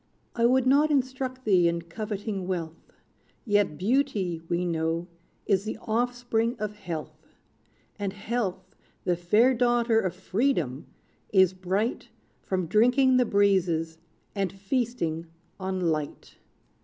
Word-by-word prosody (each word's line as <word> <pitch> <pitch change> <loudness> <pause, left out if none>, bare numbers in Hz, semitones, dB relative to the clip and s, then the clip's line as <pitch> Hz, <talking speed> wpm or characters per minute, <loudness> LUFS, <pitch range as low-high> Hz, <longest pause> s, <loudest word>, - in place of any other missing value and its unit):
I 235 0 +4
would 260 +1 +3
not 285 +4 +4
instruct 260 -2 -1
thee 185 -5 +4
in 170 0 -1
coveting 205 +1 -4
wealth; 170 -3 -5 0.5
Yet 205 -8 +2
beauty, 195 -6 0
we 175 +1 0
know, 165 0 -1 0.4
is 195 -1 +2
the 215 - -4
offspring 240 0 0
of 210 0 -3
health; 175 -7 -8 0.6
And 200 -1 -2
health, 200 -3 -4 0.3
the 175 - +1
fair 210 +9 +3
daughter 240 -2 +3
of 185 -5 -2
freedom! 185 - -1 0.4
is 190 -2 +5
bright 190 +5 -2 0.3
From 185 -2 -2
drinking 250 - +4
the 250 - +4
breezes, 180 -6 +1 0.3
and 195 -3 -1
feasting 195 -6 -2 0.3
on 190 0 -2
light. 155 -4 -3
200 Hz, 120 wpm, -27 LUFS, 175-240 Hz, 0.6 s, is